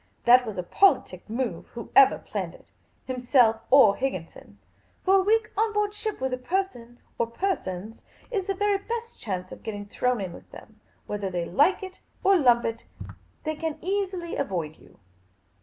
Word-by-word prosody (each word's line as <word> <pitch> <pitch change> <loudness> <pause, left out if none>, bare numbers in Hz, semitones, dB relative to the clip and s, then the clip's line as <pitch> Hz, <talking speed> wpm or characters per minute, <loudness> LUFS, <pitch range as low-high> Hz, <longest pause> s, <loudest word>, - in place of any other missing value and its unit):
That 245 0 +6
was 210 -3 -5
a 180 - -2
politic 185 - +2
move, 225 -7 -3
whoever 250 +3 +4
planned - - -5
it - - -20 0.2
— - - -40
himself 250 -3 +3
or 240 -7 +7
Higginson; 220 -11 -5 0.5
for 385 +1 +5
a - - +4
week 435 +3 +2
on 435 +1 +1
board 415 -1 0
ship 430 0 -4
with 260 0 -2
a 255 - -2
person 250 -6 -3 0.2
or 235 - +1
per 380 +12 0
sons 190 - -7 0.3
is 400 -5 -2
the 390 - -1
very 410 0 +1
best 465 +3 -6
chance 185 -4 -4
of - - -10
getting 205 -2 -6
thrown 250 +4 0
in 185 -3 -4
with - - -13
them; - - -14 0.3
whether 205 -2 -3
they 175 -2 -2
like 290 - +2
it 375 0 -9 0.2
or 390 0 +5
lump 245 -8 +4
it, 230 0 -3 0.6
they 310 0 -2
can't 315 0 -3
easily 370 -2 -2
avoid 170 - -3
you. - - -20
255 Hz, 180 wpm, -26 LUFS, -, 0.6 s, or